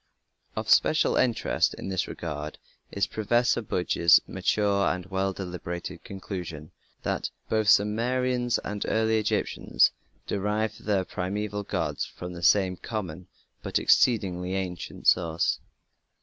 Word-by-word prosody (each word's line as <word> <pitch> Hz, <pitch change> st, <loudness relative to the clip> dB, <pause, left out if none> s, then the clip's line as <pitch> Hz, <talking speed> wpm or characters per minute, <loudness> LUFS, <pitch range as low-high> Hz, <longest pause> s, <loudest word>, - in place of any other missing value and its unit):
Of 110 Hz, 0 st, -3 dB
special 155 Hz, +7 st, +4 dB
interest 125 Hz, -3 st, +1 dB
in -, -, -6 dB
this 95 Hz, -2 st, -1 dB
regard 75 Hz, -2 st, -5 dB, 0.3 s
is 100 Hz, 0 st, +1 dB
Professor 120 Hz, +3 st, +1 dB
Budge's 90 Hz, -5 st, +4 dB
mature 100 Hz, -2 st, +1 dB
and 90 Hz, -1 st, -1 dB
well 95 Hz, 0 st, -1 dB
deliberated 90 Hz, -2 st, -6 dB
conclusion 90 Hz, -5 st, -7 dB, 0.3 s
that -, -, -1 dB, 0.2 s
"both 110 Hz, -1 st, +1 dB
the -, -, +9 dB
Sumerians 120 Hz, +3 st, +1 dB
and 105 Hz, -1 st, -3 dB
early 110 Hz, 0 st, +2 dB
Egyptians 105 Hz, -, +2 dB, 0.3 s
derived 105 Hz, +2 st, -2 dB
their 100 Hz, -3 st, +1 dB
primeval 105 Hz, +3 st, -3 dB
gods 100 Hz, -, -2 dB
from 90 Hz, -1 st, -7 dB
some 90 Hz, +1 st, +3 dB
common 90 Hz, -3 st, -5 dB, 0.3 s
but -, -, -1 dB
exceedingly 95 Hz, -6 st, +2 dB
ancient 90 Hz, -3 st, -5 dB
source". 85 Hz, -1 st, +2 dB
100 Hz, 120 wpm, -27 LUFS, 90-110 Hz, 0.3 s, the